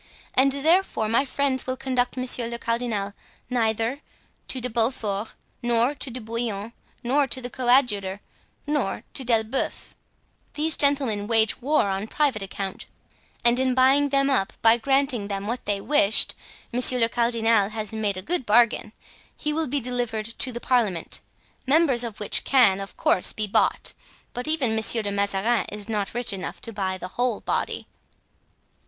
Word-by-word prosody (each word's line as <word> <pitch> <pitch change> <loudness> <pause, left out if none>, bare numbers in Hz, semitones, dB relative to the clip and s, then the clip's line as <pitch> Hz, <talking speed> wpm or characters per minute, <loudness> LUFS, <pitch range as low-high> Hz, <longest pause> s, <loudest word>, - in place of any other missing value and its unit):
And 270 +1 +4
therefore 300 - +2
my 230 +5 +3
friends 270 -1 0
will 255 0 -2
conduct 255 -1 -1
monsieur 255 -2 -1
le 235 0 -5
cardinal 230 -4 -2 0.4
neither 230 +3 0 0.5
to 260 - -1
De 250 - -3
Beaufort, 225 -3 -2 0.3
nor 240 +2 +2
to 285 - 0
De 255 +1 -6
Bouillon, 225 -1 -4 0.3
nor 275 +4 +2
to 260 - +1
the 245 -1 -6
coadjutor, 240 -7 +2 0.5
nor 295 -8 -1
to 270 - -4
D'Elbeuf. 230 +1 -1 0.6
These 310 +1 +2
gentlemen 270 -8 +2
wage 225 0 +2
war 295 +5 +2
on 195 +1 -2
private 275 -5 0
account, 195 0 -5 0.6
and 240 +1 +4
in 260 -1 +1
buying 270 +2 +4
them 275 0 +3
up, 260 -9 +1
by 225 0 +7
granting 270 -3 +1
them 200 -1 -4
what 235 +4 -4
they 205 -1 0
wished, 220 -3 +3 0.4
monsieur 250 +1 +4
le 230 -2 +3
cardinal 230 -3 +2
has 215 -1 -4
made 210 -3 -1
a 185 - -6
good 350 - 0
bargain. 225 -1 +3 0.4
He 300 0 -2
will 320 +1 -1
be 285 +3 -1
delivered 245 -3 -2
to 255 - +3
the 240 - -5
parliament, 225 -9 0 0.5
members 275 -4 +4
of 230 -3 -6
which 210 - +2
can, 235 -8 +4
of 195 0 -8
course, 180 - +2
be 215 - -1
bought, 205 - 0 0.4
but 245 +4 -2
even 280 -8 +2
Monsieur 220 0 +2
de 205 - -2
Mazarin 200 +3 +1
is 210 -1 -6
not 210 -2 -3
rich 240 -3 -2
enough 190 -1 -6
to 230 - -7
buy 190 -2 -2
the 180 0 -7
whole 245 -3 +1
body." - - -2
235 Hz, 165 wpm, -24 LUFS, 210-260 Hz, 0.6 s, by